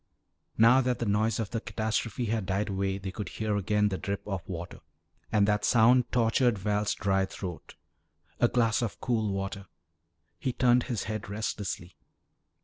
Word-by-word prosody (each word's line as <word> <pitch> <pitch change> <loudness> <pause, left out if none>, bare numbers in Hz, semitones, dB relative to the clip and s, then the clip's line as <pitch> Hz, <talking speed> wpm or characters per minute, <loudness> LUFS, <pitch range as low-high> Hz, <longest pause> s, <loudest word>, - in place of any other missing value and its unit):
Now 120 +4 +6
that 125 -1 0
the 120 - -2
noise 110 +2 +1
of 110 -3 -3
the 115 - -2
catastrophe 110 +2 -2
had 110 -3 -1
died 100 +2 0
away 95 0 -1
they 95 -1 -5
could 95 -1 -5
hear 110 -1 -2
again 105 +1 +1
the 95 - -3
drip 100 0 -4
of 95 -3 -2
water. 85 -1 -6 0.5
And 100 -1 +3
that 105 0 +1
sound 120 +1 +4
tortured 120 0 +2
Val's 105 +1 0
dry 95 -1 +1
throat. 90 -3 -7 0.6
A 120 - +5
glass 115 -2 +2
of 115 - -3
cool 110 -4 0
water 95 0 -4 0.7
He 130 - -1
turned 125 -1 +3
his 115 -5 -1
head 110 -1 -5
restlessly. 100 -4 -4
105 Hz, 165 wpm, -29 LUFS, 100-115 Hz, 0.7 s, Now